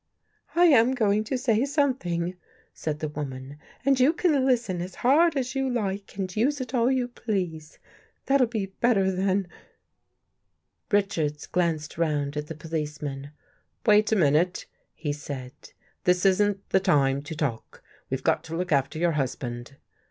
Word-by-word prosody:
" - - -43
I 350 +1 +6
am 260 -5 +5
going 215 -3 +2
to 260 - -1
say 240 -2 +2
something," 255 - 0 0.4
said 155 -2 -3
the 155 - -1
woman, 140 -1 -7
" - - -28
and 275 -1 +3
you 265 +5 +5
can 300 -7 +2
listen 230 -9 +1
as 180 +1 -6
hard 305 +4 +5
as 255 -1 -2
you 270 -1 0
like 205 -5 -3
and 185 -2 -3
use 275 +7 +1
it 255 -1 -6
all 240 -1 +3
you 255 -2 +1
please. 180 -10 -4 0.5
That'll 270 -2 +3
be 220 -4 -2
better 195 0 +1
than... 190 0 0 0.7
." - - -51
Richards 170 -8 0
glanced 165 -3 -1
round 150 -3 0
at 150 0 -3
the 160 - -6
policeman. 150 -3 -5 0.3
" - - -45
Wait 210 -1 +5
a - - +4
minute," 170 +1 +2 0.3
he 145 -3 -3
said. 140 -3 -7 0.3
" - - -38
This 180 +1 +3
isn't 200 +1 +2
the 190 - +5
time 140 -7 +2
to 150 +2 -7
talk. 140 -8 -4 0.3
We've - - -3
got - - +1
to 160 - -5
look 180 0 -3
after 140 +2 +1
your 170 +1 +2
husband." 130 -3 -4
185 Hz, 170 wpm, -26 LUFS, 150-240 Hz, 0.7 s, I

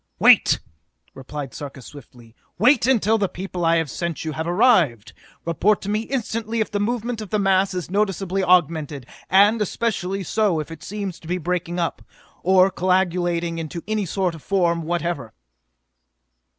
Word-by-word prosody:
"Wait!" - - +5 0.5
replied 135 -1 -7
Sarka 140 -2 -8
swiftly. 120 -4 -14 0.2
"Wait 240 +4 +4
until 225 -4 +3
the 200 -2 0
people 185 -1 -5
I 165 0 +4
have 165 -1 +1
sent 170 +2 -4
you 160 - -2
have 160 +2 -4
arrived! 175 - +3 0.3
Report 185 +5 +2
to 200 - -4
me 210 +1 +1
instantly 230 -2 -3
if 220 - -1
the 205 - -1
movement 235 +1 -2
of 210 - -7
the 215 - 0
mass 195 -1 +2
is 180 -1 -5
noticeably 195 -1 0
augmented, 160 -6 +1 0.2
and 205 +4 +5
especially 195 -3 -2
so 200 -3 +1
if 155 +1 -6
it 165 -1 -9
seems 200 -3 -5
to 160 - -14
be 180 +2 -1
breaking 175 0 -3
up, 170 - -2 0.4
or 190 +1 +4
coagulating 175 -2 0
into 165 +1 -6
any 215 -3 -1
sort 185 0 -1
of 165 - -11
form 175 -3 +1
whatever!" 170 -6 -3
180 Hz, 165 wpm, -22 LUFS, 165-205 Hz, 0.5 s, Wait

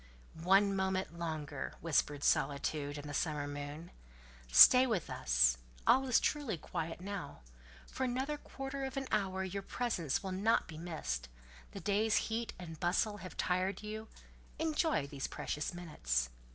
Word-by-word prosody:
"One 195 +3 +4
moment 190 -2 -1
longer," 155 - -4
whispered 145 -1 +1
solitude 145 0 +1
and 145 0 -7
the 145 - -6
summer 150 -1 -1
moon, 145 +3 -6 0.6
"stay 250 - +9
with 215 -9 -1
us: - - +3 0.3
all 265 +2 +5
is 250 - +5
truly 285 - -1
quiet 165 +2 -5
now; 195 - -6 0.4
for 265 - -4
another 265 +4 -2
quarter 270 -1 -6
of 265 0 -4
an 270 - -1
hour 190 -3 0
your 190 +1 -3
presence 195 - -1
will 190 - -3
not 205 +5 +2
be 155 -1 -9
missed: 155 - -4 0.4
the - - -6
day's 210 +2 +1
heat 230 +1 0
and 165 -3 -8
bustle 205 +4 +1
have 185 -2 -9
tired 185 +2 0
you; 215 +1 -6 0.5
enjoy 315 - +1
these 140 -1 -4
precious 150 - -3
minutes." 60 - -2
185 Hz, 150 wpm, -34 LUFS, 150-220 Hz, 0.6 s, stay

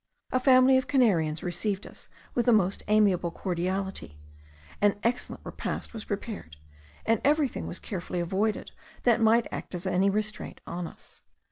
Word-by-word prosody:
A 255 - +2
family 260 0 +6
of 260 - -5
Canarians 170 - +2
received 190 +3 -2
us - - -10 0.2
with 240 -1 0
the - - +7
most 200 -3 +3
amiable 205 -5 +3
cordiality; 185 - -3 0.6
an 205 -1 +4
excellent 240 +2 -1
repast - - -4
was 220 -2 -7
prepared, 200 - -5 0.5
and 225 -1 +2
everything 290 -2 +1
was - - -4
carefully 180 -2 -4
avoided 195 +5 -1 0.3
that 235 -2 +4
might 225 +1 +5
act - - -6
as 175 +2 -5
any 185 +1 +3
restraint 215 0 -3
on 175 0 -4
us. - - -13
205 Hz, 150 wpm, -28 LUFS, 180-230 Hz, 0.6 s, the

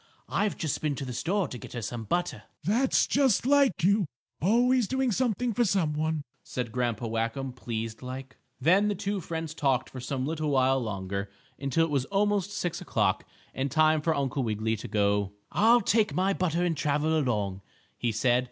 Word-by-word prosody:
I've 205 -1 0
just 155 -5 -2
been 150 -2 0
to 135 - -5
the 125 - -5
store 185 - 0
to 125 - -7
get - - -10
her 120 - -4
some 115 +1 -4
butter." 175 - -1 0.2
"That's 235 - +3
just 265 -6 +2
like 275 -9 +3
you; 200 0 +3 0.3
always 240 - +3
doing 265 +1 +1
something 240 +1 0
for 240 - +2
some 185 -7 +1
one," 155 0 -1 0.2
said 125 -3 -4
Grandpa 120 -1 -1
Whackum, 115 +4 -2
pleased 115 -2 -5
like. 130 +1 -7 0.2
Then 185 +9 +4
the 205 - 0
two 200 0 -2
friends 160 -2 -4
talked 135 -4 0
for 130 - -7
some 130 +1 -3
little 155 0 -2
while 135 -1 +3
longer, 100 -2 -3 0.3
until 140 +4 +2
it 165 - -5
was 135 -3 +1
almost 205 +1 +1
6 175 -3 -3
o'clock, - - 0 0.3
and 135 +1 -1
time 155 +2 +3
for 160 +1 +1
Uncle 140 -1 -1
Wiggily 110 -1 0
to - - -7
go. 100 -1 +1 0.2
"I'll 235 +3 +5
take 215 +1 +2
my 190 +2 +2
butter 175 -2 0
and 170 -2 +1
travel 150 +2 +1
along," 105 -10 0 0.3
he 120 - -1
said. 120 +3 +3
150 Hz, 190 wpm, -28 LUFS, 125-195 Hz, 0.3 s, I'll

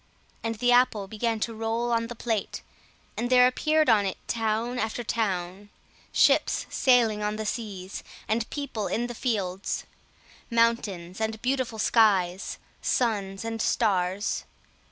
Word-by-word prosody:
And 225 0 -2
the 245 +3 +2
apple 245 -5 +3
began 225 +1 -1
to 230 - -1
roll 225 +2 -1
on 230 0 +1
the 240 - -7
plate, 225 -3 -2 0.5
and 240 - -2
there 250 -1 +7
appeared 310 +5 +2
on 220 -4 +5
it 195 - -2
town 230 +2 -1
after 225 +2 -2
town; 200 -3 -2 0.4
ships - - +3
sailing 235 -5 +3
on 210 0 -1
the 215 0 -4
seas, 200 -4 -5 0.2
and 225 +1 0
people 280 -8 -3
in 235 - -1
the 240 - -5
fields; 200 -6 -2 0.7
mountains 220 -6 0
and 220 0 -1
beautiful 255 -3 -1
skies; 195 -5 +2 0.2
suns 205 -4 0
and 225 -1 -3
stars. 195 -4 0
225 Hz, 135 wpm, -27 LUFS, 205-240 Hz, 0.7 s, there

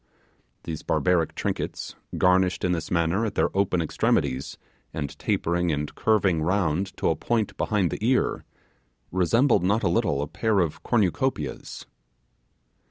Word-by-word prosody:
These 80 -2 -5
barbaric 90 -3 +1
trinkets, - - -3 0.2
garnished 90 0 +3
in 90 - +1
this 85 -2 -2
manner 85 +4 +1
at 110 - -2
their - - +1
open 95 -3 +1
extremities, 65 -3 0 0.4
and 70 -3 -4
tapering 85 0 0
and 75 0 -3
curving 95 -7 +2
round 95 +1 0
to - - +1
a - - 0
point 110 +6 -1
behind 100 -6 0
the - - -5
ear, 125 +3 +1 0.7
resembled 115 - +3
not 105 +5 +1
a - - +3
little 75 -4 +1
a - - -4
pair 110 +5 0
of 85 -4 -1
cornucopias. 105 - -1
90 Hz, 140 wpm, -25 LUFS, 80-105 Hz, 0.7 s, garnished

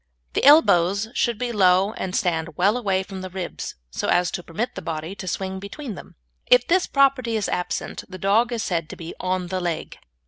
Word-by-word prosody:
The - - 0
elbows 200 - +5
should 235 -2 0
be 245 +1 -2
low 190 -1 +4
and 185 -1 -4
stand 165 -3 -1
well 200 +5 +3
away 195 -6 0
from 190 -1 -8
the 185 - -6
ribs, 185 -1 -5 0.2
so - - -3
as 175 0 +2
to 175 - -4
permit 175 +9 -4
the 190 - -6
body 160 +1 -4
to 195 -1 -8
swing 190 +1 -3
between 215 +6 -7
them. - - -12 0.3
If 250 0 +6
this 365 +1 +3
property 265 -5 +2
be 205 - -2
absent 180 0 -3
the 185 - -8
dog 215 +6 +2
is 235 -2 -2
said 165 -3 -2
to - - -7
be 165 0 -8
"on 185 -1 -2
the 185 0 -1
leg." 170 -3 -4
190 Hz, 210 wpm, -23 LUFS, 180-230 Hz, 0.3 s, If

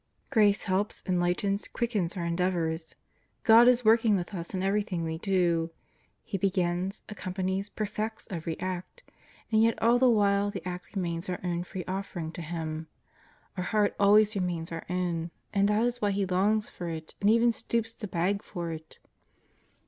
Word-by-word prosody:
Grace 205 -2 +4
helps, 200 +2 -1
enlightens, 185 +2 0
quickens 210 -6 -1
our 170 - -2
endeavors. 170 -2 -1 0.5
God 230 +2 +8
is 250 -1 +4
working 225 -1 +5
with 180 +1 -3
us 170 -3 -5
in 185 -1 -2
everything 195 -3 0
we 160 0 -3
do. 175 -3 +1 0.5
He 195 - -4
begins, 185 0 0
accompanies, 190 -1 -3
perfects 215 +1 -4
every 165 -2 -4
act. 185 - -5 0.5
And 220 0 +4
yet 230 0 +3
all 235 +2 +4
the 255 0 +5
while 205 -2 +3
the 195 -3 -6
act 180 +3 -7
remains 170 -2 -2
our 180 - -2
own 175 -1 -1
free 180 -1 -6
offering 185 -4 -4
to 175 - -7
Him. 160 -1 -4 0.7
Our 180 -1 -3
heart 210 0 +1
always 210 +1 +5
remains 175 -4 -2
our 165 0 -6
own, 175 -2 -1 0.2
and 200 0 +3
that 210 +3 +2
is 245 0 -2
why 205 - +2
He 200 0 0
longs 200 +4 +1
for 175 -1 -5
it 160 -1 -6
and 200 - +4
even 230 +2 +5
stoops 230 0 -2
to 210 - -6
beg 190 +3 0
for 170 -4 -5
it. 160 -1 -9
190 Hz, 170 wpm, -29 LUFS, 175-210 Hz, 0.7 s, God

